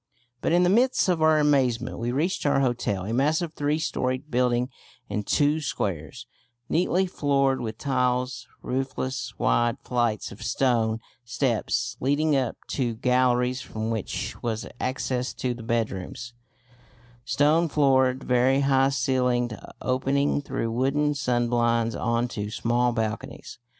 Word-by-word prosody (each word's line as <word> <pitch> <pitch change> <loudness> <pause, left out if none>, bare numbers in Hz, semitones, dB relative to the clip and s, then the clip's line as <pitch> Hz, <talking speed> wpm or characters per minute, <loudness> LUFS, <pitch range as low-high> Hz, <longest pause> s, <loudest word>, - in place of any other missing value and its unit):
But - - 0
in 175 +1 +4
the 180 - +4
midst 245 +5 +3
of 175 -3 +1
our 155 0 +5
amazement 130 -5 +1
we 120 +1 -1
reached 165 +9 -1
our 140 - +3
hotel, 115 -7 -1
a 110 - -3
massive 155 +6 +1
three 145 0 0
storeyed 130 -2 -2
building 125 +1 +1 0.4
in 105 - -1
two 145 +8 +2
squares, 100 - -3 0.4
neatly 180 +2 +2
floored 140 -6 +1
with 110 -2 -4
tiles, 125 -1 -1 0.2
roofless, 130 -2 -3
wide 120 -1 +2
flights 120 -4 -1
of 100 - -11
stone 115 -3 +1 0.2
steps 120 -1 -1
leading 145 +3 +2
up 130 -4 0
to 120 -4 -1
galleries 125 +1 +2
from 110 +1 -4
which 110 -4 -4
was 115 -2 -2
access 130 -1 -2
to 125 -1 -2
the 120 - -9
bedrooms, 115 0 -3 0.9
stone 155 +6 +2
floored, 130 -3 +3
very 130 +2 +3
high 135 -1 +3
ceilinged, 125 -2 +1 0.3
opening 135 +3 +1
through 115 -5 -3
wooden 140 +5 +1
sunblinds 120 -3 +1
on 115 +1 0
to 105 -3 -4
small 120 +3 +1
balconies. 110 0 -4
125 Hz, 135 wpm, -25 LUFS, 120-140 Hz, 0.9 s, our